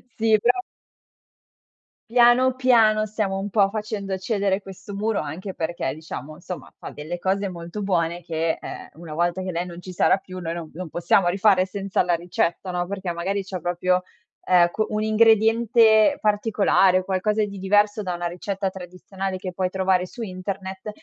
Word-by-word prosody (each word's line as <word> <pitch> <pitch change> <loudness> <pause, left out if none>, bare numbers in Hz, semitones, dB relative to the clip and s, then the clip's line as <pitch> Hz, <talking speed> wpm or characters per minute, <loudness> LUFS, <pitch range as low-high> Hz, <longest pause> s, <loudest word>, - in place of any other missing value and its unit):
Sì, 220 -1 +3
però 245 - +3 1.5
Piano 245 +2 +5
piano 225 -4 +4
stiamo 210 -2 -2
un 195 +1 -3
po' 200 -1 +3
facendo 205 -2 -4
cedere 200 0 0
questo 195 +1 -10
muro, 215 +1 0
anche 175 +6 -5
perché, 165 -4 -3
diciamo, 155 0 -8
somma, 180 0 -8
fa - - -8
delle 160 +4 -6
cose 195 +1 0
molto 170 +3 -7
buone 175 -3 0
che, 160 0 -1
ehm, - - -8
una 160 -1 -10
volta 175 +3 0
che 185 - -3
lei 175 +1 -2
non 175 0 -9
ci 185 - -9
sarà 180 - +3
più 185 -1 -9
noi 165 -2 -4
non 170 -2 -7
non 180 +3 -6
possiamo 175 +3 +2
rifare 190 0 +3
senza 195 0 -1
la 175 -1 +1
ricetta, 175 +1 -2
no, 175 0 -2
perché 190 -2 -4
magari 190 +4 -2
c'è 190 -1 -6
proprio 180 +2 0 0.4
ecco, 180 +4 +3
un 215 0 -1
ingrediente 225 +2 +4
particolare, 205 -3 +3
qualcosa 200 +3 0
di 200 -1 -5
diverso 205 +2 +2
da 180 -2 -3
una 175 0 -3
ricetta 190 +2 -3
tradizionale 185 +1 -6
che 185 0 -5
puoi 185 0 -1
trovare 185 -1 +1
su 235 - -10
internet, 190 0 -5
190 Hz, 170 wpm, -23 LUFS, 175-210 Hz, 1.5 s, Piano